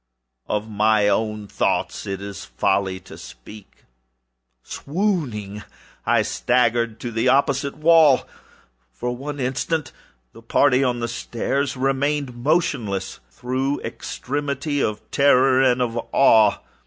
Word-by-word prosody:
Of 105 +1 -2
my 105 0 +2
own 105 0 -1
thoughts - - -2
it 95 0 -4
is 100 -1 -7
folly 95 -1 -1
to - - -13
speak. 105 -1 -14 0.8
Swooning, 140 - -3 0.5
I - - +3
staggered 115 -2 0
to 120 - -4
the 115 +2 0
opposite 140 +1 +1
wall. 155 -3 +5 0.6
For 120 - -4
one 145 +3 -6
instant 135 +4 -2 0.4
the 115 - -14
party 130 +3 +3
upon 125 -3 0
the 115 - -1
stairs 130 +4 -2
remained 135 0 -1
motionless, 120 - -1
through 130 +3 -2
extremity 145 +1 -3
of 105 0 -1
terror 135 -2 +4
and 125 -1 +3
of 120 -1 -2
awe. 110 -6 +5
125 Hz, 115 wpm, -22 LUFS, 110-140 Hz, 0.8 s, wall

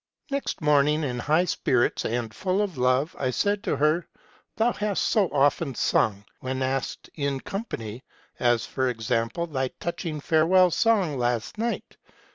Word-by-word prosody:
Next 280 -8 -2
morning, 150 +1 +3
in 125 -4 -2
high 155 +7 +2
spirits 125 -7 +1
and 115 -1 -2
full 185 - -1
of 195 -5 -4
love, 130 +4 +1
I 130 - 0
said 205 - 0
to - - +1
her, 155 +4 +1 0.2
' - - -33
Thou 235 +2 +2
hast 205 -2 -1
so 210 -5 +3
often 140 0 +2
sung, 100 -2 +1
when 130 +1 -3
asked 130 0 -2
in 140 -3 -2
company; 130 - -6 0.4
as, 120 -2 +2
for 130 -1 -1
example, 115 +6 -1
thy 130 -5 -1
touching 165 -2 -4
farewell 170 +5 +4
song 195 - +2
last 120 - -1
night. 235 +1 -3
145 Hz, 155 wpm, -26 LUFS, 125-180 Hz, 0.4 s, farewell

